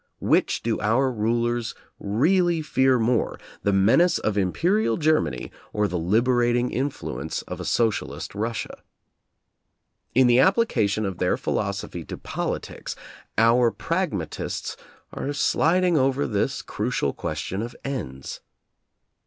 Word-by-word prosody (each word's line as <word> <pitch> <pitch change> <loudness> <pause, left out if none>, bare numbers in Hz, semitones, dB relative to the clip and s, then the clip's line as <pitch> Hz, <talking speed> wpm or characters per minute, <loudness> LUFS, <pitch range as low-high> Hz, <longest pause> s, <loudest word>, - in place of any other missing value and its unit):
Which - - +1
do 115 -1 0
our 125 +5 +2
rulers 120 +1 0 0.2
really 165 - +2
fear 130 -3 +3
more, 115 0 0 0.2
the 100 - +1
menace 115 - +4
of 110 - -1
Imperial 170 - +1
Germany, 155 - +1 0.2
or 105 0 +1
the 90 -2 -2
liberating 120 +6 +2
influence 80 - -3
of - - -7
a - - -5
socialist 115 -3 -1
Russia. 110 +3 -4 1.3
In 130 +1 +6
the 120 0 +5
application 120 - +2
of 95 -3 -4
their 90 - +1
philosophy - - -3
to - - -7
politics, - - -4 0.4
our 115 +2 +5
pragmatists 110 - -3 0.4
are 145 - -3
slid 165 +5 +2
ing 175 -4 +3
over 135 +1 +2
this 105 -3 -1
crucial 70 - -1
question 80 +6 -4
of 120 +2 -6
ends. 65 - -5
120 Hz, 120 wpm, -24 LUFS, 105-140 Hz, 1.3 s, In